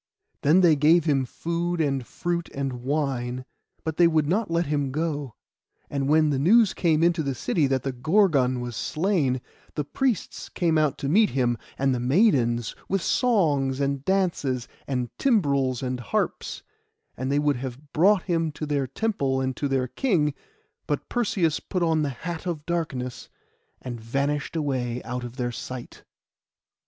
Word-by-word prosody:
Then 160 +6 +5
they 170 -4 +6
gave 155 +3 +4
him 140 -4 +2
food, 170 +5 -2
and 135 -4 0
fruit, 170 -1 -3
and 135 -3 -3
wine; 130 -3 -2 0.4
but 160 -1 -3
they 175 - +6
would 155 -3 +2
not 200 +6 0
let 170 +1 +1
him 145 -2 -1
go. 145 -4 -2 0.6
And 140 -1 -1
when 155 0 +4
the 135 - 0
news 210 - +5
came 165 -2 +2
into 170 -1 +3
the 140 -3 -2
city 145 +4 +1
that 130 -2 0
the 135 - -1
Gorgon 135 -3 +2
was 120 -1 -5
slain, 155 - 0 0.3
the 150 - -1
priests 230 - -2
came 170 -3 0
out 150 -3 +1
to 140 - -3
meet 205 +8 +4
him, 125 -3 +1 0.2
and 135 0 +2
the 125 - -1
maidens, 125 - +2 0.2
with 195 -2 0
songs 150 - +2
and 140 -1 -1
dances, 165 -9 0 0.2
and 125 -3 -2
timbrels 140 - +2
and 125 -1 -2
harps; 120 - -2 0.5
and 130 +2 -3
they 140 - +2
would 145 -2 +2
have 135 +3 -8
brought 190 +3 +4
him 165 -3 0
to 155 - -5
their 145 -3 0
temple 140 - -1
and 130 -1 -1
to 145 - -1
their 135 -2 0
king; 155 - +1 0.5
but - - -2
Perseus 195 -9 +1
put 180 -2 -2
on 160 -2 +2
the 145 - 0
hat 165 +6 -6
of 155 -4 -3
darkness, 140 -8 -3 0.5
and 120 -3 -7
vanished 140 +7 -1
away 130 -6 -1
out 125 0 -4
of 120 0 -7
their 120 -2 -1
sight. 125 +1 -8
145 Hz, 165 wpm, -25 LUFS, 130-170 Hz, 0.6 s, they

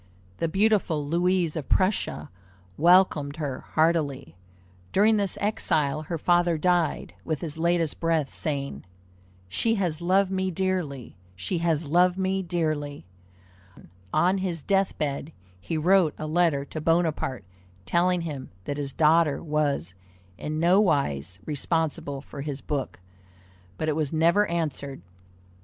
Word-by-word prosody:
The 165 - 0
beautiful 195 -5 +1
Louise 175 +1 +1
of 155 -5 -5
Prussia 185 - 0 0.4
welcomed 165 - +4
her 145 -5 -4 0.2
heartily. 155 - +1 0.6
During 215 +2 +4
this 200 -2 -1
exile 155 -8 0
her 165 +2 -4
father 175 +1 +2
died, 175 -1 0
with 155 -3 -3
his 160 -1 -5
latest 170 -2 +1
breath 165 -4 0
saying," 140 -3 -3 0.6
She 225 - 0
has 175 -6 -1
loved 190 +2 +2
me 190 0 0
dearly! 175 - -3 0.2
She 95 - -3
has 165 -2 0
loved 180 +4 +3
me 190 0 0
dearly!" 155 -5 -2 1.1
On 185 +2 +2
his 175 -5 -3
death 195 -1 +1
bed 145 +1 -3 0.3
he 160 - -3
wrote 175 0 +3
a 155 - -5
letter 155 -3 +1
to 155 - -6
Bonaparte 160 - 0 0.4
telling 180 +1 +2
him 145 -6 -6
that 145 - -4
his 140 -2 -4
daughter 160 -1 +3
was 150 - -1 0.4
in 155 +9 -4
nowise 145 - +2
responsible 145 -2 -2
for 140 - -8
his 140 -1 -4
book, 140 - -4 0.8
but 155 - -2
it 155 - +1
was 150 -3 -1
never 170 +6 +3
answered. 145 - -3
160 Hz, 130 wpm, -26 LUFS, 145-180 Hz, 1.1 s, welcomed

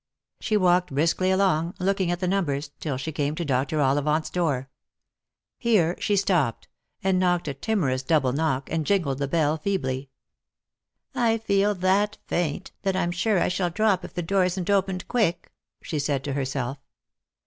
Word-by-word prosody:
She 215 - +1
walked 180 -3 +3
briskly 165 +5 +2
along, 185 -3 +2
looking 190 -1 +1
at 175 0 -1
the 185 - -1
numbers, 150 -7 -1
till 145 -5 -3
she 135 +5 -4
came 145 0 -1
to 170 - -3
Dr. 135 +2 0
Ollivant's 145 +3 +1
door. 145 -7 0 0.9
Here 190 -8 +2
she 205 - +1
stopped, 175 - +1 0.4
and 190 -1 +2
knocked 175 -3 +1
a 140 - -2
timorous 135 -5 0
double 135 -3 +2
knock, 140 -3 0
and 160 0 0
jingled 150 -7 0
the 140 - -1
bell 155 0 +1
feebly. 140 -7 -2 0.5
" - - -65 0.2
I 225 -2 +2
feel 205 -1 +1
that 195 +3 +1
faint, 175 +1 -2
that 195 -1 0
I'm 175 -2 0
sure 185 +3 +1
I - - +2
shall 180 0 0
drop 195 +1 +1
if - - -9
the 175 - -2
door 195 +3 +2
isn't 180 +1 -1
opened 190 -2 0
quick," 210 -8 0 0.3
she 155 - -3
said 140 -2 -1
to 140 - -3
herself. 135 -1 -2
175 Hz, 170 wpm, -25 LUFS, 145-190 Hz, 0.9 s, walked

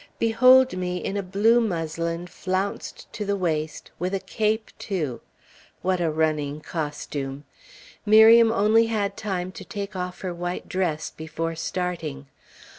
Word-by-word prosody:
Behold 255 +2 +5
me 180 -1 -2
in 195 - -3
a 200 - 0
blue 210 +5 +3
muslin 170 -3 -2
flounced 185 +2 -4
to 210 - -4
the 200 0 0
waist, 160 -5 -2
with 180 +3 -1
a - - -1
cape, 220 +2 -1
too! 155 - -3 0.6
What 185 0 +1
a 165 - +2
running 155 -2 0
costume! 145 -3 -4 0.6
Miriam 225 +2 +7
only 225 +1 +4
had 205 -3 -1
time 185 -4 -3
to - - -9
take 200 -1 -6
off 180 0 -4
her 185 -2 -3
white 175 +1 -4
dress 170 -5 -1
before 160 +1 -4
starting. 165 -4 -3
180 Hz, 140 wpm, -25 LUFS, 160-210 Hz, 0.6 s, Miriam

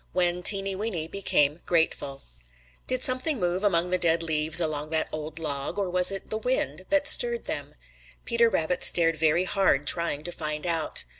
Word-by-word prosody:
X. - - -38
WHEN 180 -1 -1
TEENY 195 +1 +5
WEENY 190 -6 -5
BECAME 150 -6 -1
GRATEFUL 160 -5 -2 0.6
|DID 255 0 -1
something 255 +2 +1
move 180 +1 -3
among 180 -3 0
the 185 - 0
dead 165 -1 +1
leaves 155 0 +3
along 155 -2 -3
that 160 0 -1
old 155 0 -7
log, 145 0 -4
or 195 -3 -3
was 180 0 +3
it 195 - -8
the 220 - -3
wind 190 - -3
that 290 -1 +1
stirred 475 +4 +4
them? - - -6 0.5
Peter 235 -1 +1
Rabbit 175 -2 -2
stared 165 -2 +4
very 160 +3 +1
hard 185 -7 0
trying 170 -2 +2
to 175 - -7
find 150 -2 -4
out. 165 -3 -1
175 Hz, 180 wpm, -24 LUFS, 155-195 Hz, 0.6 s, TEENY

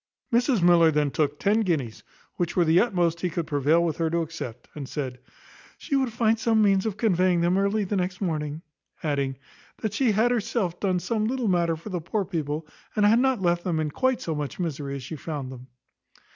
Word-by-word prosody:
Mrs 240 -4 +3
Miller 170 -2 +6
then 150 -2 +1
took 145 0 0
ten 210 +5 +2
guineas, 150 - -1 0.3
which 175 -1 -2
were 175 - +3
the 165 +2 +5
utmost 175 -7 +1
he 180 - 0
could 170 0 -3
prevail 150 +3 +2
with 160 -3 -2
her 165 -1 0
to 170 +1 0
accept, 125 -8 -7
and 140 -3 -7
said, 130 -4 -4 0.6
"She 280 - -3
would 265 -3 +1
find 225 0 +1
some 225 0 +2
means 195 0 +3
of 210 -2 -3
conveying 185 -5 +2
them 175 +2 +2
early 200 +2 +1
the 200 +1 -2
next 180 0 -2
morning;" 155 -4 -3 0.4
adding, 140 -3 -1 0.4
"that 215 -2 -3
she 240 -2 +2
had 225 +4 +3
herself 210 -6 -1
done 185 -3 +1
some 215 +4 -1
little 250 -1 -1
matter 170 -3 +2
for 165 +7 -9
the 180 -3 -3
poor 195 +4 -2
people, 155 -4 -3 0.3
and 210 -1 +3
had 220 +3 +5
not 260 -6 +1
left 175 0 +1
them 170 -4 -1
in 155 -1 -1
quite 260 - 0
so 165 - -2
much 150 +1 -4
misery 145 -5 -3
as 135 - -6
she 160 - -6
found 145 -4 -5
them." 130 0 -11
175 Hz, 215 wpm, -25 LUFS, 155-210 Hz, 0.6 s, Miller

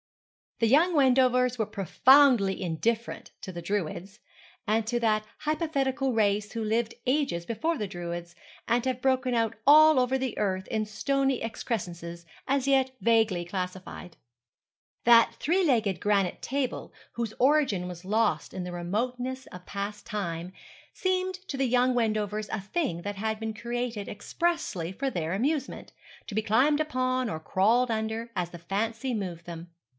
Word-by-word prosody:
The 230 - +2
young 325 +8 +4
Wendovers 250 -2 +4
were 220 - 0
profoundly 235 - +4
indifferent 220 +7 -2
to 185 - -6
the 170 -1 -7
Druids, 195 +2 -3 0.5
and 220 +1 +1
to 240 +1 0
that 215 -2 +1
hypothetical 275 -4 0
race 210 -1 +1
who 230 -1 -3
lived 225 +1 0
ages 255 - 0
before 310 +9 -1
the 210 - -2
Druids, 175 -1 -6 0.3
and 235 0 +2
have 255 -1 -1
broken 260 -1 +1
out 225 -2 +1
all 305 0 +8
over 255 +1 +1
the 260 -2 -3
earth 190 -2 -1
in 220 -1 -1
stony 270 +5 0
excrescences, 175 -7 -5 0.2
as 275 0 +1
yet 265 -1 +3
vaguely 220 -4 +2
classified. 180 -1 -6 0.9
That 230 -1 +6
three 360 +6 +1
legged 225 - +2
granite 200 -3 0
table, 270 -1 -3 0.2
whose 230 -2 -3
origin 260 -10 +3
was 180 0 -9
lost 215 +2 0
in 185 - -4
the 180 - -5
remoteness 245 +9 -3
of 180 0 -11
past 200 +1 -5
time, 175 -5 -4 0.4
seemed 370 0 -1
to 275 - -4
the 265 -1 +1
young 250 +1 +3
Wendovers 215 -2 -1
a 215 - -3
thing 210 - -2
that 205 0 -4
had 220 +2 -2
been 220 0 -3
created 235 -1 -4
expressly 205 - -2
for 270 +8 -2
their 165 -4 -2
amusement, 270 +7 -2 0.3
to 200 - -6
be 220 - +2
climbed 270 +8 +3
upon 255 -4 0
or 160 - -4
crawled 225 +9 +2
under 220 +1 -2
as 180 -2 -1
the 175 - -9
fancy 225 +8 -2
moved 180 -6 -4
them. 170 0 -8
225 Hz, 155 wpm, -28 LUFS, 195-260 Hz, 0.9 s, all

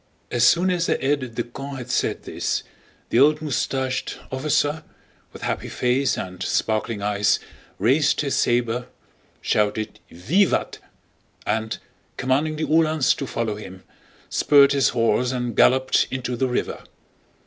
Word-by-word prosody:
As 120 - +1
soon 180 +2 +4
as 180 -1 0
the - - +1
aide 130 -4 -1
de 120 - -1
camp 135 +3 -8
had 125 -1 -6
said - - 0
this, - - -2 0.5
the 120 - +3
old 150 +3 +5
mustached 130 -3 -2
officer, 145 +3 0 0.5
with - - -11
happy - - -2
face 130 +2 +1
and 90 0 -6
sparkling 110 +1 -1
eyes, 105 -1 +2 0.4
raised 135 +9 +2
his 140 -2 -1
saber, 120 +1 +1 0.5
shouted 105 +1 0
"Vivat!" 155 - +1 0.7
and, 110 +1 -1 0.4
commanding 140 +5 0
the 155 +1 -2
Uhlans 155 -2 +3
to 140 - -5
follow 115 -3 -2
him, 95 -3 -10 0.4
spurred 140 -1 +5
his 140 -2 +3
horse 120 +1 +1
and 125 -2 -3
galloped 130 0 +4
into 125 -1 -3
the 130 +2 0
river. 125 - -2
130 Hz, 135 wpm, -23 LUFS, 115-145 Hz, 0.7 s, old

